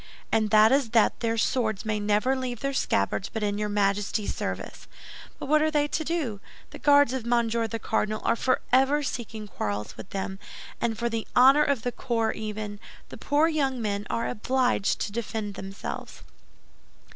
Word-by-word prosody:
And 215 -1 +2
that 215 +1 +6
is 270 -3 +2
that 220 - +3
their 230 -1 -1
swords 220 -3 0
may 215 -1 -1
never 210 +6 +2
leave 250 -3 -4
their 275 0 -1
scabbards 190 - 0
but 220 -2 -4
in 205 0 -1
your 210 0 -1
majesty's 205 +1 0
service. - - -5 0.5
But - - -6
what 305 +2 +3
are 310 - +3
they 295 -1 +1
to 315 - -1
do? 300 -11 -2 0.3
The - - -9
Guards 285 -3 +5
of 260 -3 -2
Monsieur 235 -1 +1
the 230 - -4
Cardinal 215 -1 -1
are - - +2
forever 265 +3 +2
seeking 225 -5 -5
quarrels 105 - -4
with - - -9
them, 190 0 -4 0.4
and 225 -2 0
for 235 +1 -1
the 225 -1 -3
honor 270 +4 +7
of 280 -6 0
the 245 - -1
corps 230 -3 -1
even, 210 -1 -5 0.3
the - - -9
poor 295 +3 +2
young 275 -5 0
men 205 -2 -2
are 230 - -1
obliged 250 -2 0
to 205 - -2
defend 220 -2 -4
themselves." 195 0 -7
225 Hz, 180 wpm, -26 LUFS, 210-260 Hz, 0.5 s, honor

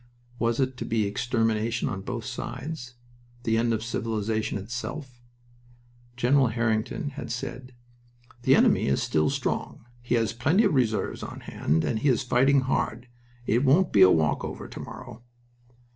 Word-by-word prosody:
Was 115 +1 +1
it 130 -1 0
to - - -4
be 110 -2 +1
extermination 115 +1 0
on 95 - -3
both 115 +2 -5
sides? 125 +1 -6 0.5
The 115 -2 +1
end 115 +1 +2
of 110 -1 -1
civilization 110 -2 -2
itself? 120 +5 -6 1.0
General 130 +2 +4
Harington 110 +4 -1
had 140 -4 -7
said: 125 +1 -6 0.7
"The - - +5
enemy - - +4
is 70 - +1
still 75 0 +1
very - - -1
strong. - - -3 0.2
He 120 0 0
has 115 -2 +1
plenty 145 - +3
of - - +2
reserves 115 -6 0
on - - -7
hand 80 +3 0
and 110 - 0
he 145 - +2
is 130 +1 +2
fighting 135 +3 +4
hard. 125 -2 -2 0.4
It 120 +3 +2
won't 160 +7 +4
be 100 - +5
a 95 - +9
walk 80 -3 +2
over - - -6
to - - -9
morrow." 125 -3 -9
120 Hz, 160 wpm, -26 LUFS, 110-130 Hz, 1.0 s, a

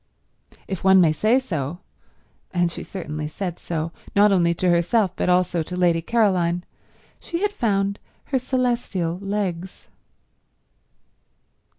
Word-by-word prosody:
If 190 -3 -5
one 190 0 +6
may 165 -4 +5
say 215 +10 +3
so, 165 - -4 0.7
and 175 -2 +1
she - - -6
certainly 155 -5 -5
said 175 +2 -5
so, 165 -1 -3 0.2
not 205 +1 +6
only 175 -3 +3
to 185 - 0
herself 180 +3 +2
but - - -1
also 180 -1 +2
to 180 +3 -5
Lady 175 -2 +2
Caroline, 180 -5 +1 0.6
she 340 +3 -4
had 415 - +2
found 200 - 0 0.2
her 265 - -1
celestial 240 -9 -1
legs. 195 -3 -4
185 Hz, 125 wpm, -23 LUFS, 170-205 Hz, 0.7 s, one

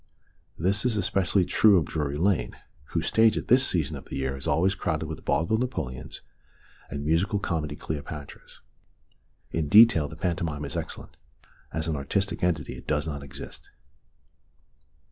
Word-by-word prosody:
This 95 +5 +1
is 120 -4 +1
especially 95 -1 +1
true 105 +1 +5
of 80 - +2
Drury 75 -1 -2
Lane, 85 -8 0 0.3
whose 85 +2 -2
stage 110 +3 +4
at - - -5
this 130 +2 +5
season 80 -6 0
of - - -9
the - - -7
year 65 0 -2
is 65 - -5
always 85 +6 +2
crowded 80 -5 -2
with 80 -1 -7
vaudeville 85 +8 +1
Napoleons 70 - -4 0.7
and 70 0 -5
musical 85 +7 +2
comedy 80 -6 -2
Cleopatras. 75 -1 -7 0.9
In 80 -3 -1
detail 105 -8 +7
the - - -9
pantomime 85 -5 -2
is 70 - -6
excellent; - - -6 0.5
as 80 -1 -3
an 80 - 0
artistic 95 +6 -2
entity 85 -4 0
it - - -13
does 75 0 0
not 75 -3 -4
exist. 70 -1 -10
80 Hz, 155 wpm, -27 LUFS, 75-95 Hz, 0.9 s, detail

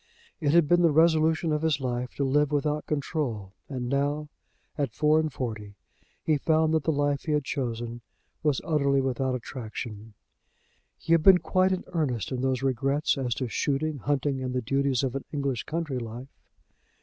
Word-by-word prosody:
It 145 - +1
had 170 -3 +5
been 175 +3 +4
the 170 - +5
resolution 160 +1 +3
of 150 - 0
his 160 -3 +1
life 125 -1 -3
to 140 - -1
live 145 +2 +2
without 150 +1 -1
control, 135 - -2 0.2
and 125 -3 -4
now, 145 +3 -1 0.5
at 140 -6 -2
four 155 +1 +4
and 155 -1 -1
forty, 110 -6 -5 0.5
he 155 -2 +2
found 160 +1 +2
that 160 -3 +1
the 160 - +3
life 145 -1 0
he 155 - 0
had 150 -1 +1
chosen 120 -3 -3 0.4
was 150 -4 +1
utterly 140 -4 +2
without 130 0 0
attraction. 110 -3 -7 0.8
He - - -5
had 165 - +5
been 190 +3 +8
quite 185 +3 +1
in 185 - -1
earnest 135 - -1
in 125 -1 -2
those 130 0 0
regrets 135 +3 +1
as 125 -4 -2
to 130 - -2
shooting, 145 +4 -1
hunting, 140 0 -1
and 130 -1 -3
the 125 - +1
duties 135 +1 +1
of 130 -2 -1
an 135 - -3
English 140 -5 -2
country 155 -5 -2
life. 120 +3 -8
140 Hz, 180 wpm, -27 LUFS, 125-155 Hz, 0.8 s, been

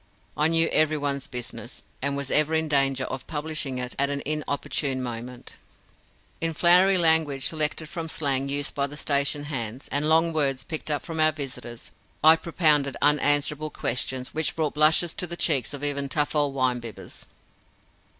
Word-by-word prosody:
I 150 - +3
knew 165 0 +3
everyone's 145 -3 0
business, 125 -3 -8 0.2
and 140 +1 -1
was 140 -1 -5
ever 155 +1 +2
in 160 0 0
danger 135 -2 +1
of 130 0 -6
publishing 155 -3 -4
it 125 0 -4
at 140 0 +2
an 140 0 -3
inopportune 140 -2 -2
moment. 120 +1 -7 0.8
In 165 -1 0
flowery 180 +3 +5
language, 160 -5 +2
selected 155 0 -2
from 165 0 -6
slang 140 -3 -1
used 145 0 -2
by 140 0 -1
the 145 +1 -10
station 145 0 0
hands, 125 -4 -5
and 145 +2 +1
long 165 +1 +3
words 135 -4 0
picked 155 -2 -5
up 145 -1 -1
from 165 -2 -5
our 155 0 +4
visitors, 130 -5 -8 0.3
I 160 +1 +8
propounded 155 -4 +2
unanswerable 145 +1 +3
questions 130 -1 -3
which 160 0 -1
brought 155 -2 -1
blushes 155 +3 +3
to 180 - -2
the 170 0 -5
cheeks 140 -10 +1
of 145 0 -7
even 140 -1 -2
tough 150 +2 -1
old 145 -2 +2
wine 130 -2 +1
bibbers. 115 -2 -10
145 Hz, 170 wpm, -25 LUFS, 135-155 Hz, 0.8 s, I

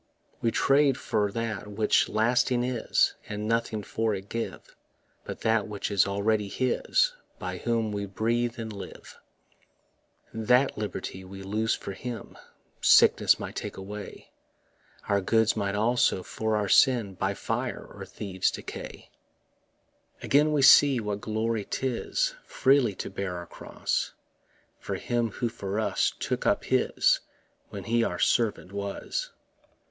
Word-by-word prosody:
We 115 - +2
trade 135 +2 +3
for 105 -1 0
that 115 -2 -3
which 105 +1 +2
lasting 120 +3 +2
is, 125 -2 +1 0.2
And 105 0 -4
nothing 115 -2 -1
for 110 +1 -1
it 95 +1 -8
give 115 0 -5 0.5
But - - -7
that 110 -2 +2
which 105 -1 -4
is 100 -1 +3
already 105 +1 0
His 130 - +1 0.2
By - - -5
whom 115 -2 0
we 100 -1 -3
breathe 115 +4 -1
and 110 -2 -5
live. 100 - -10 1.1
That 125 +5 +3
liberty 105 -2 -5
we 95 +1 -10
lose 110 +3 0
for - - -7
him 120 +4 -7 0.5
Sickness - - +6
might - - -6
take - - -5
away; 100 +2 -8 0.8
Our 100 -1 +2
goods 110 +3 +2
might 100 -2 -1
also 110 -3 +2
for 110 +3 -2
our 105 -1 0
sin 115 -2 +4
By 95 +2 -2
fire - - -3
or - - -8
thieves 95 -3 -2
decay. - - -8 1.1
Again 150 +2 +3
we 145 -2 +2
see 140 -1 +7
what 105 -2 -3
glory 110 0 -1
'tis 135 - -1
Freely 130 -6 +3
to - - -6
bear 95 -2 -4
our 85 - -7
cross - - -3 0.7
For - - -4
Him 120 -1 -1
who 120 +3 -2
for 100 -2 -4
us 110 - +1
took - - -2
up - - +2
his - - +2 0.5
When - - -7
he 115 +1 +1
our 90 -6 -1
servant 105 -4 +1
was. 100 - -4
110 Hz, 140 wpm, -27 LUFS, 100-120 Hz, 1.1 s, see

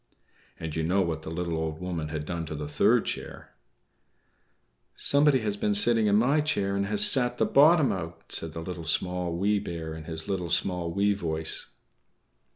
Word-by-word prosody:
And 80 -2 -6
you 80 - -1
know 90 +5 +1
what 80 -2 -3
the 80 - -8
little 85 0 -3
Old 80 0 -4
Woman 85 -4 -4
had 75 -1 -5
done 85 -1 -4
to 75 - -6
the 75 0 -5
third 75 - +2
chair. - - -7 1.4
"=Somebody 140 -2 +3
has 105 -1 -2
been 105 0 0
sitting 115 +1 +4
in 100 - +3
my 130 +8 +3
chair 100 -10 -1
and 100 0 -1
has 105 0 +3
sat 125 -2 +3
the - - +2
bottom 150 0 +5
out!=" 85 -2 -7
said 80 -1 -3
the 80 - -6
Little, 85 -1 -7
Small, 90 +1 -1
Wee 100 +3 +1
Bear, 85 -5 -6
in 80 0 -9
his 80 0 -5
little, 90 -3 -3
small, 90 0 0
wee 100 +3 +1
voice. 80 -5 -1
90 Hz, 185 wpm, -27 LUFS, 80-105 Hz, 1.4 s, bottom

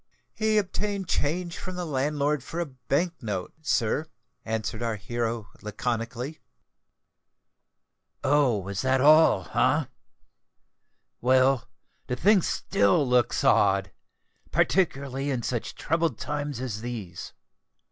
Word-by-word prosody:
"He 215 0 +1
obtained 200 -1 -1
change 170 +3 -1
from 185 -1 -6
the 180 -1 -3
landlord 145 -1 0
for 165 - -5
a 175 - 0
bank 140 +6 -2
note, 100 -6 -4
sir," 150 0 0 0.4
answered 110 0 -3
our 115 -2 -1
hero 115 0 -3
laconically. 120 +6 -3 1.8
"Oh! 135 -7 +3
that 130 +7 +1
was 150 - +6
all—eh? - - +3 1.4
Well—the 130 0 0
thing 200 - +4
still 100 - +2
looks 125 -1 +2
odd—particularly 135 - 0
in 125 -4 -1
such 120 -1 -3
troubled 165 0 0
times 145 -3 -3
as 120 -5 -4
these. 110 -8 -6
130 Hz, 100 wpm, -27 LUFS, 115-155 Hz, 1.8 s, was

